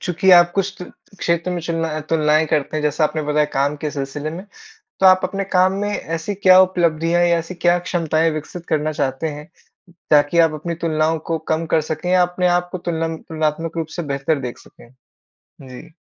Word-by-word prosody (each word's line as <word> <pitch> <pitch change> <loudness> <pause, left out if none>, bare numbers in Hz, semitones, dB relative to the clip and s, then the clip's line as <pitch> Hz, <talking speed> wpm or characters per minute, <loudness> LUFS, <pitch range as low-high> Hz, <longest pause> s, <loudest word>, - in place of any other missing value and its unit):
चूँकि 180 +1 +1
आप 175 -1 +7
कुछ 195 -1 -2 0.4
क्षेत्र 170 +1 -1
में 180 -1 -2
चुलना 165 -2 -3
तुलनाएँ 155 -1 +2
करते 155 0 -1
हैं, 155 - -2
जैसा 150 +1 +1
आपने 155 +1 -1
बताया 150 0 +1
काम 140 +2 0
के 150 0 -4
सिलसिले 145 +2 -5
में, 175 +4 -8 0.6
तो 190 - +3
आप 185 0 +6
अपने 195 +2 -2
काम 185 +1 +4
में 205 - -1
ऐसी 165 -1 -4
क्या 185 -1 +6
उपलब्धियाँ 175 -2 +1
या 170 -1 +3
ऐसी 165 +2 -6
क्या 175 0 +2
क्षमताएँ 165 -2 0
विकसित 155 +3 -7
करना 155 0 0
चाहते 135 +1 -2
हैं, 150 +2 -9 0.6
ताकि 150 +3 +4
आप 165 -2 +4
अपनी 165 +3 -4
तुलनाओं 160 0 +1
को 165 - +1 0.2
कम 165 +1 -2
कर 160 - +3
सकें 160 +3 -4
या 185 0 +4
अपने 180 +1 0
आप 175 0 +1
को 185 - -4
तुल 170 -2 -4 0.2
तुलनात्मक 160 +1 -3
रूप 160 -1 -2
से 175 - -2
बेहतर 140 +2 -1
देख 125 -3 -6
सकें? 120 - -18 0.7
जी। 130 -2 -11
165 Hz, 195 wpm, -20 LUFS, 155-175 Hz, 0.7 s, आप